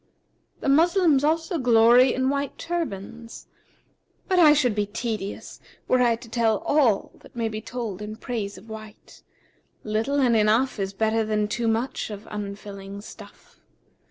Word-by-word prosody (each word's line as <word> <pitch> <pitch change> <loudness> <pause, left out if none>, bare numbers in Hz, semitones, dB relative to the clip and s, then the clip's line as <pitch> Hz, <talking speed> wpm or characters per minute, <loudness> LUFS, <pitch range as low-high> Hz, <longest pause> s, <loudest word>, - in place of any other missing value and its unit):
The - - -3
Moslems 320 0 +4
also 325 +2 0
glory 245 +1 +5
in 260 +1 0
white 280 -1 -3
turbands, 235 - -5 0.8
but 370 -1 +2
I 315 -4 +8
should 275 -6 +3
be 205 -1 -1
tedious, 215 -2 -5 0.3
were 255 - +3
I 240 -2 +3
to 230 +1 -13
tell 225 -2 +1
all 260 -9 +2
that - - -18
may 230 -1 -1
be 215 0 -5
told 220 -5 -5
in 210 +1 -6
praise 220 -4 -5
of - - -14
white; 215 -1 -11 0.6
little 220 +7 -1
and 245 -4 +3
enough 220 +3 +2
is 195 -1 -2
better 220 +2 0
than 215 -1 0
too 230 +2 -2
much 225 +3 -1
of 210 0 -8
unfilling 200 -1 -7
stuff. - - -14
230 Hz, 155 wpm, -24 LUFS, 210-265 Hz, 0.8 s, I